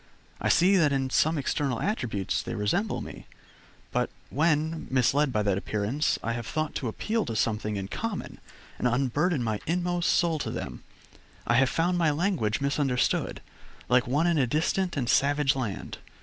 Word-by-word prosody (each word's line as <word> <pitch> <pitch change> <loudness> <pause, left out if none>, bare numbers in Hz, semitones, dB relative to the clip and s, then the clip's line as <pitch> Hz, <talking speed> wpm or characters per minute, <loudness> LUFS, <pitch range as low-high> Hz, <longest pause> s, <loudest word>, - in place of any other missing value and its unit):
I - - +1
see 190 +3 +5
that 155 -5 +4
in 135 -1 0
some 160 +4 +3
external 140 -3 -1
attributes 115 - -1
they - - -5
resemble 115 - 0
me, - - -9 0.6
but - - 0 0.2
when, 155 +1 +1
misled 135 +2 +2
by 105 -3 0
that 100 -2 +1
appearance, 105 +10 -1
I 115 - -1
have 120 0 -5
thought 155 -1 -2
to 130 - -2
appeal 215 - -1
to 115 - -4
something 105 -1 0
in 95 -1 -3
common, 220 - -5 0.4
and - - +2
unburthen 135 +5 +1
my 110 -2 -1
inmost 175 +1 0
soul 165 -3 +2
to - - -3
them, - - -5 0.6
I - - +2
have 135 0 +4
found 175 +2 +1
my 165 -2 +3
language 145 - 0
misunderstood, 140 -3 0 0.5
like 125 0 +3
one 145 +6 +2
in 170 -3 +2
a 130 - +2
distant 170 +5 0
and 125 -4 -1
savage 145 +2 +3
land. 115 -8 -4
140 Hz, 170 wpm, -27 LUFS, 120-165 Hz, 0.6 s, see